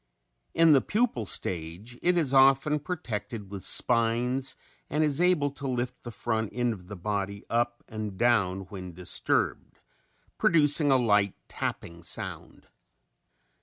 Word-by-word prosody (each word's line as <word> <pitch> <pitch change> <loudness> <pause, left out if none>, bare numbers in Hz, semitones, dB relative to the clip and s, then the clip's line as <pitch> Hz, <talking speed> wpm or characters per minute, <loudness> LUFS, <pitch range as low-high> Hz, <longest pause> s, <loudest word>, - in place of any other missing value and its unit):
In 165 -1 +6
the 135 - +5
pupal 210 - -1
stage 90 +7 -2
it 180 0 +2
is 145 -6 +1
often 135 +3 +4
protected 115 - -5
with 100 -2 -7
spines 125 +3 +2 0.3
and 150 +3 +1
is 150 +1 +1
able 175 -6 +2
to 140 0 -7
lift 125 0 -3
the 120 - -8
front 110 -2 -2
end 120 -1 0
of 90 -4 -12
the 105 - -7
body 100 +1 -4
up 120 +1 -1
and 110 -3 -6
down 100 -5 +2
when 95 -1 -9
disturbed, 90 0 -1 0.6
producing 150 -2 +4
a 135 - +5
light 105 -5 +2
tapping 85 0 -5
sound. 85 - -3
120 Hz, 135 wpm, -27 LUFS, 100-140 Hz, 0.6 s, In